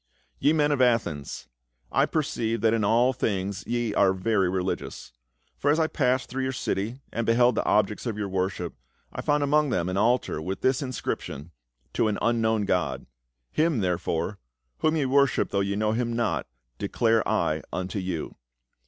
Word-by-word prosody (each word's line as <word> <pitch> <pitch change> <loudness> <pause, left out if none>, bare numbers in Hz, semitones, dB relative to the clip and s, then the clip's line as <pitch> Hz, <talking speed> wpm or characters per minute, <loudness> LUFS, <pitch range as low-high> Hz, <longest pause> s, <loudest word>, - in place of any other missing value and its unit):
" - - -40
Ye 145 - +4
men 150 -2 +2
of 140 -3 +1
Athens, 85 - 0 0.4
I - - +3
perceive 120 -8 -1
that 110 0 +3
in 115 -2 +1
all 120 +5 +3
things 100 -4 -2
ye 120 -2 -1
are 95 -2 +4
very 95 0 +1
religious. 90 -8 -3 0.5
For 145 - +1
as 150 +3 +3
I 160 - +4
passed 130 -4 +1
through 135 +1 -3
your 130 0 0
city, 115 +2 -2
and 115 - -1
beheld 120 +2 +4
the - - 0
objects 105 +3 +1
of 110 -3 -3
your 105 -1 -2
worship, 95 -2 -2 0.4
I - - -4
found 145 0 +1
among 150 +1 +3
them 90 -6 0
an 95 - -2
altar 115 -6 +1
with 95 +5 -4
this 130 +1 +2
inscription. 85 - -4 0.4
To 110 - +2
an 105 - 0
Un 115 0 +1
known 110 -2 +1
God. 90 -2 -1 0.5
Him, 155 -7 +1
therefore 90 +1 -1 0.2
— - - -50
whom 155 +1 +2
ye 145 - +1
worship 140 0 +2
though 100 - +1
ye 100 0 0
know 105 +1 +1
him 120 +1 -1
not 115 -1 -1 0.2
— - - -49
declare 115 +2 +2
I - - +1
unto 95 +3 -3
you. 90 -4 -4
110 Hz, 190 wpm, -26 LUFS, 95-125 Hz, 0.5 s, Ye